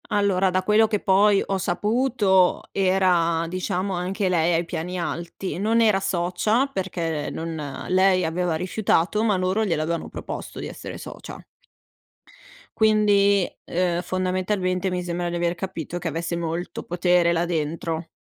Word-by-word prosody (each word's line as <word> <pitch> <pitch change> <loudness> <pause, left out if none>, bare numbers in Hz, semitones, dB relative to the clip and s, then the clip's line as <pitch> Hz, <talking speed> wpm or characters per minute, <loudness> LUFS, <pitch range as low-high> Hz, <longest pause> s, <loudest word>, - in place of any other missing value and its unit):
Allora, 195 -2 +2
da 185 0 +1
quello 215 +1 +4
che 210 -1 -1
poi 200 +1 +4
ho 195 - -1
saputo, 205 0 +2
era 180 -4 +2
diciamo 185 +2 -2
anche 185 +3 -1
lei 175 -1 +2
ai 170 +1 0
piani 175 +2 -4
alti. 170 +2 -4
Non 220 +4 +2
era 215 -4 +4
socia, 190 +9 +1
perché 170 - -3
non 160 -4 -5
lei 185 0 +3
aveva 170 0 -1
rifiutato, 185 +3 +1
ma 210 -4 +2
loro 185 +4 +1
gliel'avevano 165 -3 -1
proposto - - -7
di - - -5
essere - - -8
socia. - - -9 1.4
Quindi, 205 -3 +4 0.2
uhm, 175 -1 0
fondamentalmente, 185 +1 -1
mi 180 -1 -2
sembra 175 0 -2
di 175 - -4
aver 175 0 0
capito 175 -2 -5
che 175 - -4
avesse 165 +2 -3
molto 170 +1 -4
potere 175 0 +2
là 170 0 +1
dentro. 165 0 -3
180 Hz, 140 wpm, -24 LUFS, 170-195 Hz, 1.4 s, quello